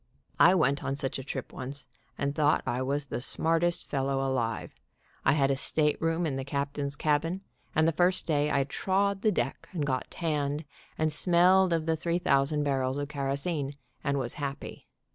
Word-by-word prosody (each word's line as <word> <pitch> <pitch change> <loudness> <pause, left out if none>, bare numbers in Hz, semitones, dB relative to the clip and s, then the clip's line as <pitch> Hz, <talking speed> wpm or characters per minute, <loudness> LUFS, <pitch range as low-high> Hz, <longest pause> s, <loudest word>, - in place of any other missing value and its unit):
I 185 - +7
went 140 -5 +2
on 135 0 -1
such 135 -1 -1
a - - -6
trip 140 - -5
once 135 +2 -6
x - - -35 0.3
and 140 0 -1
thought 150 0 +2
I 125 - -1
was 140 +2 +1
the 135 - -4
smartest 165 +5 +1
fellow 135 -1 0
alive. 115 -4 -2 0.5
I - - +4
had 140 -2 +3
a - - +2
stateroom 160 +4 0
in 140 -4 -1
the 135 - -3
captain's 140 +1 -2
cabin, 160 +6 0 0.3
and 155 +1 +4
the - - +4
first 180 +3 +1
day 150 -2 +1
I 140 -2 +2
trod 195 +7 0
the 215 - +3
deck - - -2
and 155 -5 -1
got 130 -3 -2
tanned, 150 -2 -2 0.3
and 155 -1 +1
smelled 180 +3 +4
of 165 -2 +1
the 165 0 +2
three 170 +2 -1
thousand 145 -3 +2
barrels 135 -2 0
of 145 0 -3
kerosene, 140 +1 -2 0.3
and 140 -1 0
was 120 -3 -1
happy. 140 -1 -5
145 Hz, 185 wpm, -29 LUFS, 140-165 Hz, 0.5 s, I